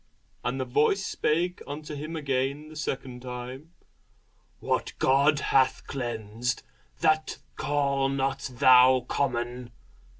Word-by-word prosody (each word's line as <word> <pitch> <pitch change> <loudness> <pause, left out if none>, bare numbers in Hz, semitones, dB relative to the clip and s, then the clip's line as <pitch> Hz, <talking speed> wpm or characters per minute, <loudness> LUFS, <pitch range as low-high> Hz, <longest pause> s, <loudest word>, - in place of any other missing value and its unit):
And 125 +2 -2
the 130 - -1
voice 150 +10 +2
spake 175 +4 0
unto 150 +1 -6
him 155 +3 -5
again 140 0 -2
the 155 - -12
second 130 -4 -4
time, 130 +5 -7 0.9
What - - -1
God 140 +3 +4 0.2
hath 130 -1 +3
cleansed, 120 -2 -3 0.4
that 155 -1 +2 0.2
call 140 -2 0
not 135 -1 -1
thou 130 0 +6
common. 125 -2 -2
135 Hz, 110 wpm, -27 LUFS, 125-150 Hz, 0.9 s, thou